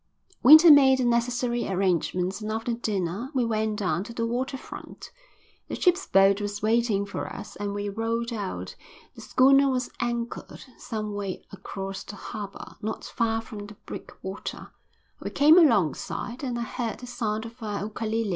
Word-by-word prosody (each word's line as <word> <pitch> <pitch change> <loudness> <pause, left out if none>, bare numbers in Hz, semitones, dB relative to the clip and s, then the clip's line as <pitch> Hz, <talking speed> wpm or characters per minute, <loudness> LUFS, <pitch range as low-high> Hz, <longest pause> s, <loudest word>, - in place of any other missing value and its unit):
Winter 315 +5 +10
made 270 -2 +7
the 255 - 0
necessary 240 0 0
arrangements 185 +1 0
and 215 0 -3
after 225 +2 -2
dinner 210 0 -2
we 250 -2 +2
went 220 -1 0
down 185 -4 0
to 220 - -9
the 230 0 -1
water 255 +3 -2
front. - - -10 0.6
The - - -4
ship's 360 +1 +2
boat 195 +1 +4
was 205 0 -4
waiting 220 -2 +2
for 200 - -5
us 210 +1 -8
and 205 0 -3
we 205 0 -3
rowed 230 +3 -2
out. 90 - -5 0.4
The - - -12
schooner 275 +1 +5
was 250 -2 -1
anchored 235 0 -4
some 215 -2 -4
way 200 -2 -4
across 195 0 -6
the 205 - -9
harbour, 200 0 -8
not 220 +1 -4
far 225 -2 -1
from 205 -2 -8
the 210 - -12
breakwater. 190 +1 -7 0.5
We - - -5
came 305 +5 +6
alongside, 235 - +1
and 250 -3 -2
I 235 - -2
heard 235 -1 -4
the 250 - -9
sound 225 -3 -3
of 230 +2 -11
a 210 -2 -3
ukalele. 220 0 -2
225 Hz, 165 wpm, -26 LUFS, 205-240 Hz, 0.6 s, Winter